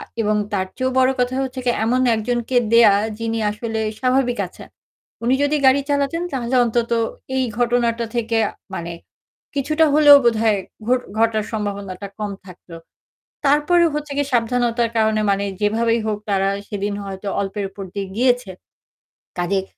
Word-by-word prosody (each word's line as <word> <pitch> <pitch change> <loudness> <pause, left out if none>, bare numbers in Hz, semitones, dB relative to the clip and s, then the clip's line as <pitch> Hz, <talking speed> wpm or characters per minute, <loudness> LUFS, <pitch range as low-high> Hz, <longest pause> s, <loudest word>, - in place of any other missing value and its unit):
আ - - -8 0.2
এবং 210 0 +1 0.2
তার 190 -2 0
চেয়েও 260 0 0
বড় 260 0 +4
কথা 250 +1 0
হচ্ছে 260 -1 -4
যে 240 - +4
এমন 250 +3 +1
একজনকে 240 +3 -2 0.2
দেয়া 230 -3 +7 0.3
যিনি 230 0 -2
আসলে 220 +1 -4 0.2
স্বাভাবিক 255 -1 +1
আছেন। - - -13 0.6
উনি 250 +2 +3
যদি 285 +1 +2
গাড়ি 265 +2 +5
চালাতেন 285 +4 0
তাহলে 255 -1 -2
অন্তত 235 0 -1 0.5
এই 260 - +2
ঘটনাটা 235 -1 +1
থেকে 230 -1 0 0.4
মানে 170 -1 -5 0.6
কিছুটা 305 +3 +2
হলেও 295 -1 +9
বোধহয় 220 -3 +3 0.3
ঘট 255 0 +3 0.2
ঘটার 220 -2 +2
সম্ভাবনাটা 200 -2 -4
কম 210 -1 -3 0.2
থাকতো। 180 -2 -13 0.7
তারপরেও 300 +5 +4
হচ্ছে 300 -1 -4
কি 285 - +2
সাবধানতার 235 0 +1
কারণে 220 -1 +2
মানে 200 0 0 0.2
যেভাবেই 230 +2 +1
হোক 215 -1 -1
তারা 195 -1 +2 0.2
সেদিন 205 -1 -3
হয়তো 195 +1 -7
অল্পের 200 +1 -3
উপর 195 +1 -9
দিয়ে 200 -1 -4
গিয়েছে। 245 -3 +1 0.9
কজেই 190 +2 0
230 Hz, 150 wpm, -20 LUFS, 210-255 Hz, 0.9 s, হলেও